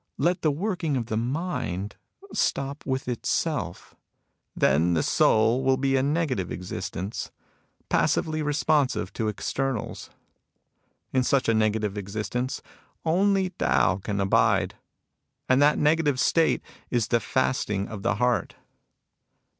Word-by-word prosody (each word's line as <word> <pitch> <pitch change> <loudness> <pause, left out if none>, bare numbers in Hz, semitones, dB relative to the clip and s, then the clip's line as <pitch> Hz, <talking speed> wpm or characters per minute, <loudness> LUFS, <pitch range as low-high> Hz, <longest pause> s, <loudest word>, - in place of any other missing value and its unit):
Let 175 +1 +1
the 155 - +3
working 165 -2 -1
of 120 - -2
the 110 - -3
mind 115 - -2 0.4
stop 140 +1 -1
with 130 -1 -2
itself. 125 -2 -2 0.6
Then 85 +4 +3
the 80 - +1
soul 115 +4 +3
will 130 0 +3
be 135 0 +1
a 130 - +3
negative 140 - -1
existence, 90 +3 -5 0.6
passively 155 0 +1
responsive 145 -8 +1
to 110 - -2
externals. 130 +3 -3 1.0
In 130 - +3
such 135 0 +2
a 115 - +4
negative 110 -2 0
existence, 110 +6 -3 0.4
only 190 +3 +2
Tao 90 - +2
can 100 +1 -3
abide. 100 -1 +2 0.7
And 130 +2 +4
that 150 +1 +5
negative 150 -3 +2
state 165 +3 +2 0.3
is 120 -3 0
the 120 - +3
fasting 105 -4 0
of 110 -3 -7
the - - +1
heart." 125 +2 0
125 Hz, 120 wpm, -26 LUFS, 105-145 Hz, 1.0 s, that